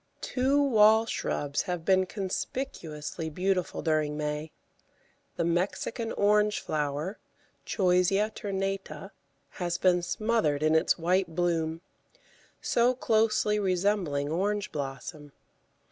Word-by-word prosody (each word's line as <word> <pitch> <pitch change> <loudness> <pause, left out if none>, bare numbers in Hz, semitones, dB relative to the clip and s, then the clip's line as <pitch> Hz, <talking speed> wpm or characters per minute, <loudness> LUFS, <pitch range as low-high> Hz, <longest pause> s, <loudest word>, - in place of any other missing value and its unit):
Two 270 +3 +1
wall 220 -4 +5
shrubs 145 -9 -2
have 175 -2 -3
been 190 0 +3
conspicuously 175 - -4
beautiful 180 +3 -1
during 155 -2 0
May; 150 +1 -3 0.8
the - - -1
Mexican 195 +7 -1
Orange 210 +1 +3
flower 150 +5 -3 0.5
(Choisya 195 +3 +2
ternata) 195 -3 -4 0.5
has 175 -1 -1
been 180 -1 +3
smothered 175 -6 0
in 155 0 +3
its 160 +1 +3
white 180 0 0
bloom, 165 -2 0 0.8
so 245 +1 +2
closely 215 -2 +2
resembling 185 -7 0
orange 205 +4 -1
blossom. 145 +1 -6
180 Hz, 100 wpm, -28 LUFS, 155-210 Hz, 0.8 s, wall